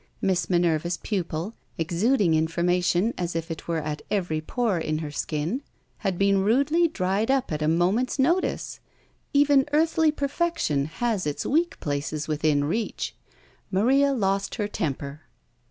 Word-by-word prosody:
Miss 185 -3 0
Minerva's 170 -1 +1
pupil, 180 0 -3 0.2
exuding 175 +4 +2
information 175 +5 +1
as 175 -1 -2
it 165 0 -4
were 170 -1 0
at 150 0 -4
every 175 -6 -1
pore 215 +2 0
in 155 -1 -1
her 155 -2 -5
skin, 155 - -2 0.4
had 195 -4 -1
been 195 0 +3
rudely 280 - +3
dried 200 - -1
up 265 -6 +1
at 155 0 -2
a 155 - +1
moment's 185 - +1
notice. 335 +8 0 0.5
Even 285 -1 +4
earthly 320 0 +3
perfection 280 - 0
has 205 +3 -1
its 145 - -3
weak 330 +4 +1
places 145 +1 -3
within 150 -1 +1
reach. 215 +10 -2 0.6
Maria 265 +9 +3
lost 195 -6 0
her 210 -3 -1
temper. 145 -5 -4
185 Hz, 140 wpm, -25 LUFS, 160-250 Hz, 0.6 s, Even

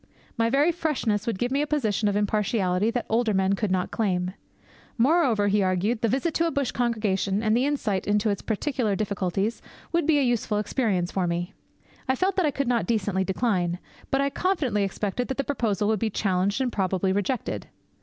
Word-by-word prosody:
My 230 0 +1
very 285 +7 +3
freshness 280 - -1
would 230 - -1
give 245 +5 -1
me 275 +2 +1
a 300 - -1
position 225 -8 0
of 200 - +1
impartiality 205 -1 +1
that 240 +1 -2
older 225 -2 +1
men 190 0 +2
could 205 +1 -1
not 185 -1 0
claim. 185 -4 -1 0.6
Moreover, 250 -6 +3
he 205 +1 +2
argued, 190 +5 0
the 230 - +2
visit 275 +8 0
to 335 +2 +2
a - - -1
bush 280 -4 -1
congregation, 210 -4 0
and 215 0 +3
the 255 +4 +2
insight 220 -10 -1
into 210 +1 +2
its 200 - -3
peculiar 225 -1 -1
difficulties, 200 +1 -1 0.3
would 335 -2 +1
be 315 -2 +4
a 285 - +3
useful 235 -4 0
experience 205 -4 0
for 185 -2 0
me. 175 +1 -2 0.6
I 260 - +3
felt 375 +7 0
that 365 -5 +3
I - - +3
could 280 -2 -2
not 240 -2 +1
decently 205 -4 0
decline; 185 -3 0 0.3
but 270 - +2
I 280 0 0
confidently 285 - 0
expected 200 +4 -2
that 265 - -3
the 275 - 0
proposal 220 -7 0
would 220 -2 +1
be 225 - 0
challenged 200 +2 0
and 255 -2 0
probably 190 -1 0
rejected. 200 - -2
215 Hz, 200 wpm, -25 LUFS, 195-260 Hz, 0.6 s, be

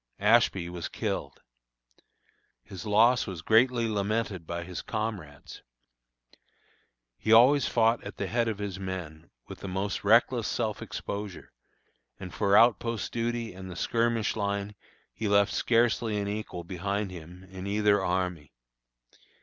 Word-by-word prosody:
Ashby 90 -3 +3
was 85 -1 -5
killed. - - -4 1.2
His 95 - -9
loss 115 +4 +4
was 90 -4 -6
greatly 115 +1 +3
lamented 105 -4 -2
by 85 0 -4
his 90 0 -6
comrades. 105 -10 -5 1.6
He 110 - -1
always 125 +5 +6
fought 115 0 +2
at 100 - -8
the 100 - -2
head 115 +4 0
of 110 -3 -2
his 100 -2 -5
men, 85 -4 -6 0.2
with - - -9
the - - -7
most 95 +2 -3
reckless 115 +2 +3
self 110 -4 -2
exposure, 100 -2 -6 0.7
and 90 -2 -8
for 100 -1 +3
outpost 115 -1 +2
duty 115 -1 -2
and 95 0 -9
the 90 - -8
skirmish 115 +1 0
line 100 -1 -2 0.4
he 110 - -3
left 100 0 +3
scarcely 115 -2 +1
an 100 -1 -2
equal 100 -4 -5
behind 100 +3 -3
him 90 +1 -11
in 95 0 -8
either 100 -1 +2
army. 90 -5 -2
100 Hz, 135 wpm, -28 LUFS, 95-115 Hz, 1.6 s, always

